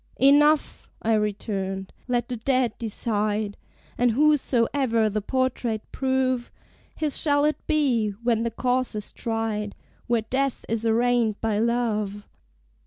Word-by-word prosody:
"Enough!" 290 +3 +3
I 225 - +2
returned, 195 -2 -2
"let 245 -1 0
the 250 - -4
dead 255 0 +1
decide: 210 -2 -1 0.4
And 245 0 +4
whosesoever 255 -4 +2
the 215 +1 -1
portrait 245 -2 -1
prove, 260 -2 0 0.5
His 305 -3 +1
shall 290 -1 +3
it 300 -1 -2
be, 270 -9 +2
when 230 -2 +2
the 235 - 0
cause 250 +1 -1
is 210 -1 -3
tried, 225 -2 -3 0.3
Where 235 -2 +1
Death 265 +3 -1
is 225 0 0
arraigned 230 -1 +2
by 220 -2 0
Love." 215 -3 -1
235 Hz, 125 wpm, -25 LUFS, 215-260 Hz, 0.5 s, And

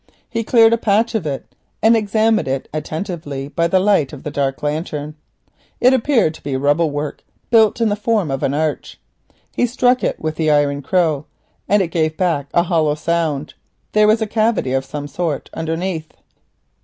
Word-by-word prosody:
He 230 -1 -3
cleared 225 0 +5
a 230 - +1
patch 225 +2 +1
of 205 -8 -1
it 140 -2 -4 0.3
and 225 +1 +5
examined 220 -2 +1
it 135 0 -2
attentively, 155 -3 -5
by 170 +2 0
the 185 +2 +3
light 190 -8 +2
of 145 - -10
the 150 - -4
dark 140 -1 -2
lantern. 150 0 -3 0.7
It 255 +2 +5
appeared 240 - +2
to - - -14
be 135 -2 -2
rubble 145 +4 +2
work 145 0 -5 0.3
built 220 -1 +4
in 230 -2 +2
the 205 - +1
form 210 -6 0
of 135 - -2
an 135 - 0
arch. 155 0 -2 0.6
He 245 - +2
struck 250 +1 +2
it - - -1
with 155 -1 -3
the 155 -1 +1
iron 145 -1 +2
crow 155 -2 0 0.4
and 205 0 +4
it 170 - -4
gave 155 -2 -1
back 165 -7 0
a 170 - +3
hollow 160 -4 +1
sound. 155 -2 -1 0.4
There 215 0 +4
was 220 +1 +3
a - - 0
cavity 215 - 0
of 135 0 0
some 145 +1 -6
sort 150 0 -3
underneath. 165 0 -3
165 Hz, 185 wpm, -19 LUFS, 145-215 Hz, 0.7 s, cleared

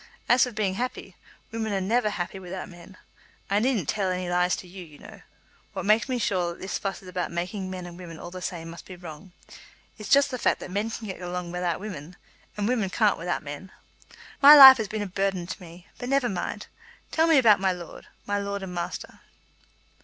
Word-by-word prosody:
As 245 +1 +4
for 250 - -6
being 210 -4 -1
happy, 250 +6 -5 0.4
women 220 -1 -3
are 195 - 0
never 215 +4 +1
happy 190 -1 -4
without 185 0 -7
men. 180 0 -14 0.5
I 200 - +3
needn't 225 - 0
tell 200 -3 0
any 180 0 -2
lies 180 +1 +2
to 185 - -10
you, 185 +1 -10
you 155 -3 -15
know. - - -13 0.5
What - - -4
makes 215 +5 +3
me 255 - 0
sure 185 -6 0
that - - -16
this 190 - -4
fuss 195 -1 -4
about 180 -1 -4
making 185 +3 -4
men 185 -1 -6
and 175 0 -10
women 170 -3 -9
all 175 - -9
the 185 0 -8
same 165 -2 -5
must 170 - -11
be 185 - -9
wrong, 175 +1 -11 0.7
is 215 - -7
just 280 0 +5
the 255 - -4
fact - - +1
that - - -8
men 205 +4 -1
can 225 0 -6
get 190 -3 -7
along 180 -1 -5
without 180 -1 -2
women, 180 -5 -8 0.4
and 205 0 -1
women 225 -6 0
can't 210 +1 +2
without 175 -1 -2
men. 145 +6 -8 0.7
My 285 +2 +11
life 265 -2 +12
has 220 -3 -2
been 215 +1 -3
a - - -4
burthen 195 -2 -2
to 185 - -7
me. 175 0 -13
But 245 - -5
never 275 -2 +2
mind. 185 -3 -4 0.5
Tell 320 +1 +3
me 325 -3 +5
about 220 -7 +6
my 190 -1 +2
lord; 175 -2 -9 0.2
my 205 0 -1
lord 200 0 -4
and 185 -1 -6
master." 175 0 -5
190 Hz, 220 wpm, -26 LUFS, 180-215 Hz, 0.7 s, life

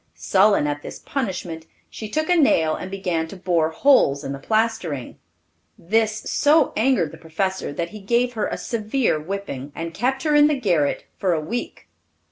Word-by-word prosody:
Sullen 200 -4 +3
at 145 0 -2
this - - -8
punishment, 180 - -4 0.2
she 215 - -8
took 310 +7 -1
a 360 - +3
nail 165 - +3
and 185 - -6
began 180 -4 -2
to 180 - -10
bore 170 -4 +1
holes 160 - +3
in 135 - -4
the 140 - -5
plastering. 215 - -1 0.6
This 220 +3 0
so 300 0 +3
angered 230 - +2
the - - -12
professor, 190 +2 -2
that 170 +3 -3
he 215 - -9
gave 240 +5 +1
her 220 -3 -1
a - - -4
severe 225 - -1
whipping, 155 -5 -5
and 165 0 -5
kept 260 +7 -1
her 305 -2 +1
in 295 0 +6
the 295 -2 0
garret 170 - +1
for 185 -3 +1
a 160 - 0
week. 195 +11 -5
195 Hz, 180 wpm, -22 LUFS, 160-235 Hz, 0.6 s, in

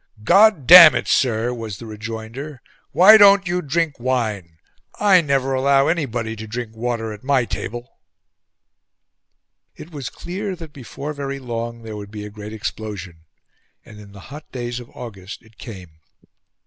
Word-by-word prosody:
"God 195 - +4
damn 170 0 +10
it, - - -2
sir!" 120 -2 0
was 110 -4 -7
the 115 - -11
rejoinder. 110 +6 -8 0.3
"Why 210 +5 +7
don't 200 -2 +6
you 180 +1 -1
drink 155 -1 -2
wine? 110 -9 -3 0.4
I 195 -3 +5
never 135 -3 -1
allow 135 +1 +2
anybody 120 -9 -2
to 110 +1 -8
drink 115 0 -6
water 115 -1 -4
at 105 - -13
my 130 -2 +1
table." 120 +3 -7 1.8
It 165 - -12
was 140 -6 -6
clear 190 +2 -6
that 165 -4 -12
before 140 +3 -8
very 140 -1 -5
long 115 -2 -6
there 110 -1 -8
would 100 -1 -9
be 105 0 -8
a 105 - -10
great 105 0 -10
explosion; 100 -6 -7 0.6
and 105 - -14
in 100 -1 -14
the 100 -1 -13
hot 150 +1 -12
days 120 -1 -5
of 120 - -12
August 105 -5 -10
it 110 -2 -24
came. 90 -9 -11
120 Hz, 160 wpm, -20 LUFS, 110-145 Hz, 1.8 s, damn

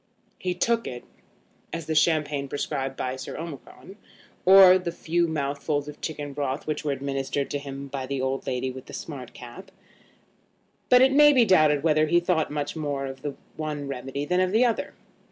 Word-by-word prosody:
He 180 -1 -2
took 230 +5 0
it, 120 -1 -7 0.7
as 165 -1 -5
the 160 - -2
champagne 150 -3 +1
prescribed 135 -1 -3
by 130 0 -3
Sir - - -7
Omicron, 165 +4 -9 0.5
or 185 0 +8
the 175 -2 -4
few 170 +1 0
mouthfuls 145 -1 -2
of 150 - -10
chicken 145 -3 -5
broth 140 -1 -3
which 155 0 -3
were 150 - -1
administered 135 0 -3
to 145 - -1
him 140 0 -7
by 135 -1 -5
the 140 0 -3
old 130 +1 -2
lady 130 +1 -2
with 130 0 -10
the - - -11
smart 135 -6 -8
cap; 120 +10 -11 1.2
but 250 0 +7
it 265 - +5
may 295 +2 +7
be 250 -4 +5
doubted 155 -7 +4
whether 155 -1 +3
he 170 +3 +4
thought 175 -2 0
much 145 0 -3
more 145 -3 -3
of 135 0 -7
the 145 -1 -4 0.2
one 150 -2 -4
remedy 135 +1 -4
than 180 +3 +1
of 185 0 +2
the 225 +4 +4
other. 235 -2 -1
150 Hz, 190 wpm, -25 LUFS, 135-170 Hz, 1.2 s, or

